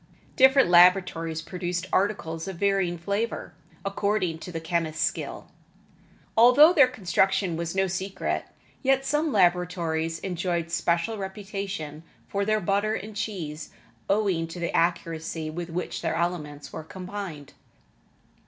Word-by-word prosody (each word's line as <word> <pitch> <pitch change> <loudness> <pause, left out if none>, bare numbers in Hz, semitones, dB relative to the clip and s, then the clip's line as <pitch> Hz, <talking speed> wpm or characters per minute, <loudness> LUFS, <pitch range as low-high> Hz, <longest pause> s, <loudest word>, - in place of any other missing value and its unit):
Different 265 -2 +6
laboratories 175 -3 +4
produced 180 0 -3
articles 165 -5 0
of 190 - -5
varying 195 -2 +1
flavor, 200 +1 -3 0.3
according 195 -4 0
to 180 - -8
the 165 - -4
chemist's 160 -2 0
skill. - - -5 0.8
Although 250 +9 +8
their 285 -7 +7
construction 190 -4 +1
was 170 +2 -3
no 190 0 +3
secret, 190 +1 -3 0.4
yet 270 0 +2
some 300 +2 +1
laboratories 175 -4 +1
enjoyed 175 -2 -2
special 170 +5 0
reputation 195 -6 -5 0.3
for 200 0 -1
their 215 +1 +2
butter 205 +3 0
and 210 +1 -7
cheese 175 -8 -4 0.4
owing 195 -5 +1
to 165 +2 -8
the 170 - -2
accuracy 165 -2 -1
with 175 +2 -5
which 175 +2 -4
their - - -1
elements 160 -4 -3
were 160 - -6
combined. 180 -4 -7
180 Hz, 125 wpm, -26 LUFS, 165-200 Hz, 0.8 s, Although